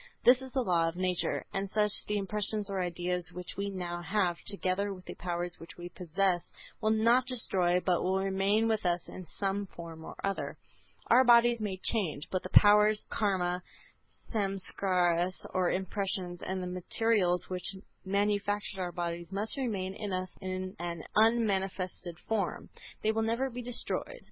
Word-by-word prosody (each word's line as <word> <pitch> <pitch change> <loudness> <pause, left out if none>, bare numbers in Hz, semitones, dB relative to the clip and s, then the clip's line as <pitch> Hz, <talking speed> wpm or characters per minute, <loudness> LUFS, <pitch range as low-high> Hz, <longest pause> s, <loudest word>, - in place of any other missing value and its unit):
This 250 +1 +7
is 260 -1 -8
the 260 -1 0
law 170 -5 +2
of 165 - -3
nature. 185 -1 0
As 195 0 -2
such, 210 -1 +3 0.2
the 210 - 0
impressions 210 0 -1
or 190 -1 -1
ideas 180 0 -2
which 180 0 -7
we 200 0 -2
now 175 -3 -4
have, 185 -2 +1
together 200 0 0
with 185 -2 -9
the - - -6
powers 175 0 -3
which 165 - -11
we 175 0 -7
possess, 180 0 0 0.3
will 215 - +2
not 230 +3 +4
be 255 - -1
destroyed 180 -6 +2
but 180 -2 +2
will 190 +1 +1
remain 195 +3 +2
with 220 -1 +1
us 175 -1 0
in 185 -2 -9
some 200 0 -2
form 165 -2 -9
or - - -8
other. 195 0 -2 0.5
Our 250 +3 +8
bodies 240 -1 +6
may 200 -3 -2
change, 185 -8 -1
but 185 - 0
the 185 - -7
powers, 210 +1 +6
Karma, 180 -4 0 0.7
Samskaras 185 -3 +1
or 185 -2 +2
impressions 185 -1 -2
and 185 0 -3
the - - -3
materials 180 0 +1
which 185 +1 -1 0.3
manufactured 205 0 0
our 175 -1 -2
bodies 170 0 -4
must 205 +3 -2
remain 205 -9 -2
in 210 -1 -5
us 185 0 -3
in 185 0 -4
an 170 -2 -4
unmanifested 195 -6 +1
form. 210 -5 -1 0.3
They 215 - +3
will 220 0 0
never 235 +4 0
be 245 +1 -5
destroyed. 245 - -2
190 Hz, 170 wpm, -31 LUFS, 180-210 Hz, 0.7 s, Our